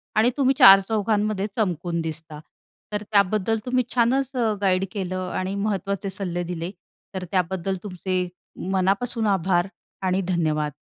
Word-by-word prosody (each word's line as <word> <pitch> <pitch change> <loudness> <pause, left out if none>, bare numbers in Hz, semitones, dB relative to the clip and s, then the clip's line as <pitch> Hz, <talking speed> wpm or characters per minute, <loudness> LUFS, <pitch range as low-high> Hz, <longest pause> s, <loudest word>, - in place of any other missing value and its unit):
आणि 220 +3 +4
तुम्ही 270 -1 +3
चार 195 0 +10
चौघांमध्ये 210 -1 0
चमकून 175 -5 -1
दिसता. 160 -1 -6 0.5
तर 210 0 -2
त्याबद्दल 210 +2 +2
तुम्ही 255 0 +1
छानच 255 +3 +2
अ, 230 -3 +1
गाईड 190 -1 +2
केलं 185 -3 -3
आणि 185 +1 -2
महत्त्वाचे 200 -1 -2
सल्ले 185 -3 -2
दिले. 170 0 -4 0.4
तर 185 - -3
त्याबद्दल 190 0 -1
तुमचे 185 -2 -2 0.4
मनापासून 200 +5 +1
आभार 175 0 +1 0.4
आणि 185 +1 +1
धन्यवाद. 155 -4 0
190 Hz, 135 wpm, -24 LUFS, 180-215 Hz, 0.5 s, चार